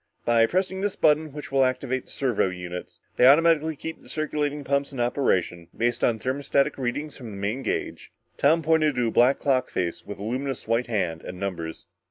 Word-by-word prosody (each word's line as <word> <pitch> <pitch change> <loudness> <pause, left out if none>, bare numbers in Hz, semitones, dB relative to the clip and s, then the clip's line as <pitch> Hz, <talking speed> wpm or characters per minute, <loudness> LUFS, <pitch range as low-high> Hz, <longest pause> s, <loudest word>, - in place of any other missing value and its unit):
"By 115 -1 +4
pressing 190 +3 -1
this 205 -1 -1
button 155 0 +3
which 150 0 -8
will 135 -1 +4
activate 130 0 -1
the - - -18
servo 125 -8 0
units. 90 -1 -7 0.2
They 125 - +7
automatically 160 +2 +5
keep 160 +3 -7
the - - -15
circulating 150 -1 -2
pumps 140 0 0
in 135 - -7
operation, 95 -9 0
based 120 +1 0
on 115 - +3
thermostatic 140 +4 0
readings 140 +4 -3
from 120 -4 -9
the 100 - -8
main 105 +7 -2
gauge." - - -4 0.2
Tom 160 +3 +3
pointed 155 -2 +3
to 125 -1 +1
a - - -5
black 125 +4 +4
clock 130 -3 +1
face, 85 -2 -3
with 100 - -8
a 100 - -7
luminous 130 +3 -3
white 115 +1 +1
hand 90 -8 -1
and 90 - -8
numbers. 85 -4 -5
130 Hz, 200 wpm, -25 LUFS, 110-150 Hz, 0.2 s, They